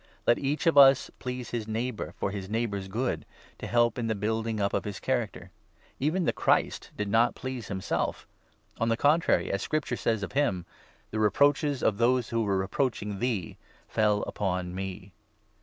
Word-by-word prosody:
Let 120 - +4
each 145 +4 -1
of 165 -4 +6
us 135 -1 +7
please 125 -1 -5
his 115 -3 -3
neighbour 115 +2 -2
2 - - -11
for 100 - -1
his 100 -2 -6
neighbour's 105 -3 -2
good, 120 +6 -2 0.4
to - - -5
help 120 +1 +2
in 115 - -1
the 110 - 0
building 110 +1 -1
up 100 0 0
of - - 0
his 105 -1 -5
character. 110 -8 -2 0.5
Even 165 +6 +1
the - - +2
Christ - - +1
did 105 - -2
not 115 +4 +3
please 130 -4 -5
himself! 95 -1 -2 0.5
On 115 - +1
the 115 - +3
3 - - -16
contrary, 155 +4 +3
as 100 - -1
Scripture 155 -5 -1
says 110 -3 0
of 100 - -4
him 100 -11 0
— - - -26
' - - -36
The 110 - -2
reproaches 140 +6 +3
of 105 -1 +2
those 120 0 +2
who 115 0 0
were 95 -3 0
reproaching1 105 -4 -1
thee 115 -8 -2 0.3
fell 105 -1 +2
upon 90 -3 -2
me.' 95 +1 -6
115 Hz, 190 wpm, -28 LUFS, 100-125 Hz, 0.5 s, us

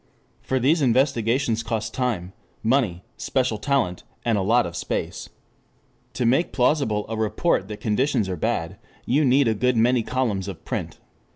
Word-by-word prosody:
For 130 - -1
these 150 +6 +3
investigations 120 -2 +2
cost 110 -1 -3
time, 110 -8 -2 0.3
money, 110 -7 +1
special 125 -5 0
talent, 120 -10 0 0.2
and 115 -2 +2
a 100 - +1
lot 115 +5 +3
of 85 - -6
space. - - -4 0.8
To 125 - -1
make 135 +9 +2
plausible 125 -5 +1
a 115 - -4
report 110 - 0
that 105 0 -8
conditions 110 0 +1
are 95 - -2
bad, 80 - -2 0.3
you 145 +5 +2
need 135 0 +4
a 110 - +3
good 125 +3 +1
many 120 +2 +3
columns 110 -6 -1
of 95 -4 -8
print. - - -4
115 Hz, 160 wpm, -24 LUFS, 105-130 Hz, 0.8 s, need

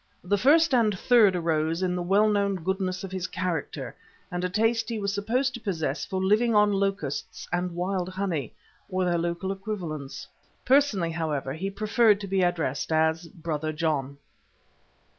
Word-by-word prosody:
The 190 +3 +1
first 300 - +4
and 220 -5 +3
third 215 -3 +5
arose 165 0 0
in 180 -1 +1
the 180 - -2
well 195 +5 +3
known 200 -2 +1
goodness 185 +1 -2
of 190 - -6
his 185 -1 -3
character 180 -3 -4 0.4
and 180 0 -3
a 180 - 0
taste 225 +3 +1
he 230 - -2
was 200 -1 -2
supposed 245 +6 0
to 240 - -6
possess 165 - -2
for 190 -2 -2
living 215 +4 +2
on 210 0 +5
locusts 195 -8 -2
and 175 0 -1
wild 180 0 -1
honey, 185 - -3 0.3
or 185 -1 0
their 175 -1 +1
local 170 +3 -2
equivalents. 180 -8 -5 0.4
Personally, 250 -11 +3
however, 150 -5 -2
he 185 +6 -3
preferred 215 +1 +3
to 200 - -5
be 195 0 +1
addressed 165 -6 -1
as 160 +1 +1
"Brother 155 -1 -4
John." 150 -3 -1
185 Hz, 165 wpm, -26 LUFS, 165-205 Hz, 0.4 s, third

